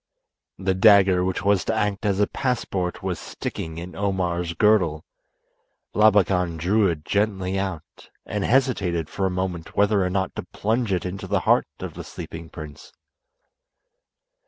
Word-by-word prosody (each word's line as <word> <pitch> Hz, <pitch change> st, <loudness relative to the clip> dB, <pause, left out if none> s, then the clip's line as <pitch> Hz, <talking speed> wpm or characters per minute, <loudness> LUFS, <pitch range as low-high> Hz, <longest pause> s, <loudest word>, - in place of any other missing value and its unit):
The 95 Hz, 0 st, 0 dB
dagger 95 Hz, -2 st, +5 dB
which 95 Hz, 0 st, -2 dB
was 100 Hz, -2 st, +3 dB
to 110 Hz, -, 0 dB
act 105 Hz, 0 st, -1 dB
as 100 Hz, -1 st, +1 dB
a 105 Hz, -, +5 dB
passport 100 Hz, -9 st, -2 dB
was 90 Hz, -3 st, -2 dB
sticking 80 Hz, 0 st, -6 dB
in 85 Hz, +2 st, -7 dB
Omar's 90 Hz, -4 st, -1 dB
girdle. 90 Hz, -6 st, +3 dB, 0.9 s
Labakan 95 Hz, -5 st, +3 dB
drew 100 Hz, +6 st, +2 dB
it 80 Hz, -4 st, -3 dB
gently 95 Hz, -2 st, 0 dB
out, 95 Hz, -5 st, -6 dB, 0.2 s
and 105 Hz, -1 st, -3 dB
hesitated 100 Hz, -, +1 dB
for 95 Hz, -1 st, 0 dB
a -, -, 0 dB
moment 90 Hz, -2 st, -4 dB
whether 100 Hz, -1 st, +3 dB
or 90 Hz, -, 0 dB
not 95 Hz, 0 st, -1 dB
to -, -, -1 dB
plunge 110 Hz, +1 st, 0 dB
it 90 Hz, -2 st, 0 dB
into 95 Hz, +1 st, -5 dB
the 100 Hz, -1 st, +1 dB
heart -, -, +3 dB
of -, -, -6 dB
the -, -, -7 dB
sleeping 80 Hz, 0 st, -8 dB
prince. 75 Hz, -3 st, -10 dB
95 Hz, 155 wpm, -24 LUFS, 90-105 Hz, 0.9 s, dagger